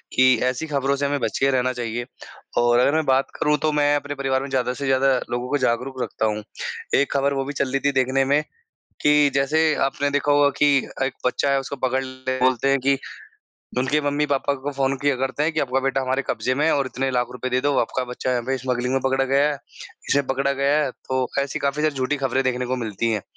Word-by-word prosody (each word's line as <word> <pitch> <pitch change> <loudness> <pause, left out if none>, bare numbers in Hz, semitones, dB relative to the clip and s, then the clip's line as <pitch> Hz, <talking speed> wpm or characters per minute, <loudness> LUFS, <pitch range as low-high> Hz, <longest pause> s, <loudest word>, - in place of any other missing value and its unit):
कि 130 0 +6
ऐसी 130 +5 -4
खबरों 140 -2 0
से 140 +1 -1
हमें 140 0 0
बच - - -2
के 135 - +3
रहना 130 -1 +1
चाहिए। 120 -1 -4 0.5
और 120 0 +4
अगर 135 +3 +3
मैं 160 -1 +1
बात 135 0 +2
करूँ 150 -2 +2
तो 155 - +2
मैं 145 -1 +2
अपने 145 0 -3
परिवार 135 -1 0
में 140 - -6
ज़्यादा 125 -2 0
से 140 - -5
ज़्यादा 135 0 +3
लोगों 120 +1 -2
को 145 - +1
जागरूक 130 0 -1
रखता - - -2
हूँ। 105 -1 -1 0.5
एक 140 - +2
ख़बर 140 0 +1
वो 135 -1 -2
भी 145 - -5
चल 135 -1 -1
रही 135 - +1
थी 140 - +4
देखने 130 +1 +1
में 145 +3 +2 0.6
कि 150 -1 +5
जैसे 155 +3 +2
आपने 145 +1 -1
देखा 145 0 +1
होगा 145 0 +5
कि 145 -1 +4 0.3
एक 130 - -1
बच्चा 140 +2 +1
है 140 0 +2
उसको 135 +1 -6
पकड़ 130 +1 0
ले 130 0 -4
बोलते 130 0 +2
हैं 140 - +3
कि 135 +1 +2 0.8
उनके 130 +4 +1
मम्मी-पापा 145 -1 0
को 145 - -2
फ़ोन 135 0 0
किया 145 0 +1
करते 135 +3 -2
हैं 160 +2 +1
कि 155 - 0
आपका 130 0 0
बेटा 135 0 0
हमारे 130 +1 0
कब्जे 120 +2 0
में 145 +3 0
है 160 - +3
और 140 -1 0
इतने 135 +1 -2
लाख 125 -1 0
रुपए 125 +1 -4
दे 125 0 +1
दो, 145 +2 +1
आपका 125 +2 -1
बच्चा 125 +1 -4
है, 125 - +1
यहाँ 120 - -3
पे 135 0 0
स्मगलिंग 125 0 -2
में 135 - +1
पकड़ा 135 0 +2
गया 140 +2 +3
है, 145 -2 -3 0.5
इसे 140 - +3
पकड़ा 135 +1 +1
गया 140 +1 +1
है, 135 - -2
तो 130 0 -3
ऐसी 140 0 -2
काफ़ी 140 +1 -1
ज़्यादा 155 -2 +1
झूठी 130 +2 0
खबरें 135 -1 0
देखने 125 -1 -1
को 130 +1 -1
मिलती 115 -1 -2
हैं। 105 -3 -1
135 Hz, 245 wpm, -22 LUFS, 130-140 Hz, 0.8 s, कि